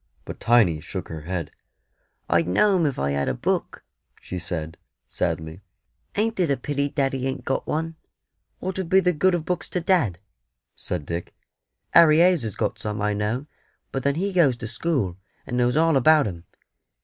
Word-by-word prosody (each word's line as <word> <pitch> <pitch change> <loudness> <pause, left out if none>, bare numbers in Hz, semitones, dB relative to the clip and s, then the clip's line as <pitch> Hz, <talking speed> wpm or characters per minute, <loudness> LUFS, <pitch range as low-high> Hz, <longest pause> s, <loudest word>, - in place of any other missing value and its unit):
But - - -8
Tiny 110 -10 +4
shook - - -6
her 80 -2 -6
head. 85 -1 -4 0.8
"I'd 85 -1 +2
know 190 - +3
'em 170 -4 +2
if 140 - -3
I 70 +1 0
had 70 -1 0
a 65 - -1
book," - - -2 0.4
she 90 - -6
said, 80 -2 -5 0.3
sadly; 80 +3 -3 0.5
"ain't 225 0 0
it 175 -4 +2
a 140 - +2
pity 140 +2 -2
daddy 135 -2 -1
ain't 135 - -4
got 135 - -1
one?" 160 +1 -2 0.6
"What 190 +1 -4
'ud 180 -3 -3
be 190 - +6
the 180 -1 +2
good 180 +4 +3
of 165 -3 -3
books 175 -4 -2
to 180 - -1
dad?" 165 - +2 0.6
said 85 -5 -4
Dick. 85 +2 -5 0.6
"Harry 155 -2 +7
Hayes 175 -1 +5
has 110 -4 -4
got 105 - -2
some, 105 0 -4
I 105 0 0
know; 105 +6 -2 0.5
but 135 - -2
then 140 +1 +1
he 195 +4 -1
goes 145 -9 +4
to 115 - -6
school, 115 - -1 0.3
and 125 - -4
knows 125 +2 +2
all 165 -1 +4
about 150 +3 +5
'em. 85 -4 -6
130 Hz, 185 wpm, -24 LUFS, -, 0.8 s, Harry